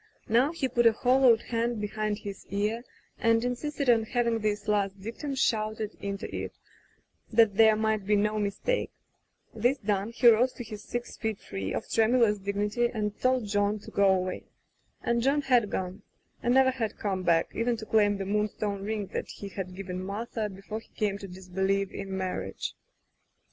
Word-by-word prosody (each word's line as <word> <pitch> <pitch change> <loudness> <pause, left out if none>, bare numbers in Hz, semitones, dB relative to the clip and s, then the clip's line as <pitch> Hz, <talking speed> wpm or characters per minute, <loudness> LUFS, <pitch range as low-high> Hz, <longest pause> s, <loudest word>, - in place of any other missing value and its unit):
Now 245 +6 +3
he 320 -5 -1
put 240 -1 +3
a 225 - +5
hollowed 250 -1 +4
hand 235 -1 -1
behind 210 0 -2
his 200 -2 -8
ear 210 +4 -1 0.4
and 230 0 +3
insisted 280 +3 -2
on 235 -2 +5
having 235 0 0
this 210 -1 -1
last 200 -2 +1
dictum 235 +8 -5
shouted 215 -4 0
into 200 0 -4
it, - - -5 0.7
that 225 -2 +5
there 220 0 +6
might 215 -2 0
be 210 - +4
no 210 +1 +1
mistake. 210 - -1 0.6
This 245 +5 +2
done, 205 -3 -1
he 240 +1 +3
rose 235 +3 +6
to 245 - -7
his 215 -2 -8
six 240 0 -5
feet 220 -2 -2
three 95 - -5
of - - -3
tremulous 225 -2 +3
dignity 205 +4 0
and 210 -3 -2
told 255 -2 +2
John 205 0 +1
to 205 - -12
go 200 -1 +4
away. 185 -1 -1 0.6
And 235 0 +1
John 280 +4 +2
had 245 -6 +3
gone, 185 +2 -3 0.4
and 245 +1 +2
never 265 0 +6
had 230 -4 -3
come 195 -3 -2
back, 170 -2 +2
even 235 0 0
to 220 - -7
claim 205 -2 +3
the 195 - -3
moonstone 205 0 -1
ring 210 0 -2
that - - -2
he 200 - -7
had 185 -1 -6
given 185 -1 -5
Martha 210 +2 -3
before 195 +3 -6
he 225 - -20
came 205 -2 -1
to 200 - -7
disbelieve 190 +2 -1
in 195 -1 -5
marriage. 180 - -3
215 Hz, 180 wpm, -28 LUFS, 200-235 Hz, 0.7 s, there